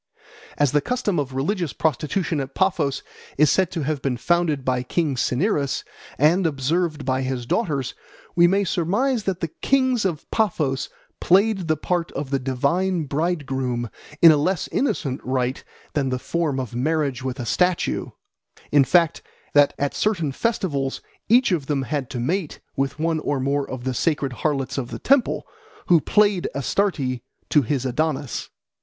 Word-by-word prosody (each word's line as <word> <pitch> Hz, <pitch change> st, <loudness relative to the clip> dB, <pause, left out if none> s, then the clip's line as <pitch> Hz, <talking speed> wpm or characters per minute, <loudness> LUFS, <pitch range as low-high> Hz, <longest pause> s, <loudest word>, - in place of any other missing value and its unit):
As 145 Hz, -3 st, +3 dB
the 150 Hz, 0 st, +3 dB
custom 215 Hz, -, -1 dB
of 135 Hz, -2 st, -3 dB
religious 170 Hz, +3 st, -1 dB
prostitution 160 Hz, +2 st, 0 dB
at 135 Hz, 0 st, -5 dB
Paphos 170 Hz, -8 st, +1 dB, 0.3 s
is 150 Hz, +1 st, +5 dB
said 190 Hz, -3 st, +2 dB
to 165 Hz, -4 st, -2 dB
have 145 Hz, -1 st, -2 dB
been 130 Hz, -2 st, -1 dB
founded 160 Hz, -2 st, +1 dB
by 125 Hz, -1 st, +1 dB
king 145 Hz, +2 st, -1 dB
Cinyras 140 Hz, -, 0 dB, 0.3 s
and 165 Hz, +5 st, +4 dB
observed 155 Hz, +1 st, -1 dB
by 130 Hz, 0 st, +1 dB
his 130 Hz, -2 st, -3 dB
daughters, 140 Hz, -, -1 dB, 0.4 s
we 175 Hz, 0 st, +6 dB
may 195 Hz, +3 st, +2 dB
surmise 205 Hz, +8 st, 0 dB
that 190 Hz, -2 st, -2 dB
the 165 Hz, -, 0 dB
kings 260 Hz, -, +1 dB
of 170 Hz, -6 st, -2 dB
Paphos 155 Hz, -11 st, 0 dB, 0.3 s
played 195 Hz, -1 st, +3 dB
the 155 Hz, -1 st, +1 dB
part 175 Hz, +2 st, -1 dB
of 140 Hz, -1 st, -4 dB
the 135 Hz, -, +1 dB
divine 155 Hz, +8 st, 0 dB
bridegroom 135 Hz, -6 st, -2 dB, 0.3 s
in 165 Hz, -, +11 dB
a 155 Hz, -, +4 dB
less 170 Hz, +3 st, 0 dB
innocent 140 Hz, -, -1 dB
rite 130 Hz, 0 st, -1 dB, 0.3 s
than 140 Hz, -3 st, 0 dB
the 130 Hz, -, -1 dB
form 150 Hz, 0 st, -1 dB
of 125 Hz, -3 st, -5 dB
marriage 140 Hz, +1 st, 0 dB
with 130 Hz, +1 st, -4 dB
a 120 Hz, -, -3 dB
statue; 180 Hz, +9 st, +1 dB, 0.6 s
in 145 Hz, -1 st, +6 dB
fact, 165 Hz, +3 st, +3 dB, 0.3 s
that 145 Hz, -1 st, +5 dB
at 145 Hz, 0 st, -1 dB
certain 170 Hz, -9 st, 0 dB
festivals 140 Hz, -, -1 dB, 0.3 s
each 245 Hz, 0 st, +5 dB
of 155 Hz, -6 st, 0 dB
them 140 Hz, -3 st, 0 dB
had 140 Hz, -1 st, -3 dB
to 125 Hz, -, -4 dB
mate 160 Hz, +6 st, -2 dB, 0.2 s
with 135 Hz, +1 st, -1 dB
one 160 Hz, 0 st, 0 dB
or 145 Hz, -2 st, -1 dB
more 140 Hz, +1 st, 0 dB
of 130 Hz, -1 st, -6 dB
the 130 Hz, 0 st, -1 dB
sacred 140 Hz, 0 st, 0 dB
harlots 135 Hz, 0 st, -1 dB
of 125 Hz, -2 st, -4 dB
the -, -, -5 dB
temple, 270 Hz, -1 st, +2 dB, 0.4 s
who 170 Hz, -3 st, +6 dB
played 205 Hz, -1 st, +3 dB
Astarte 140 Hz, -, 0 dB, 0.3 s
to 150 Hz, -, +6 dB
his 135 Hz, +1 st, -1 dB
Adonis. 145 Hz, +1 st, -2 dB
150 Hz, 165 wpm, -23 LUFS, 135-175 Hz, 0.6 s, in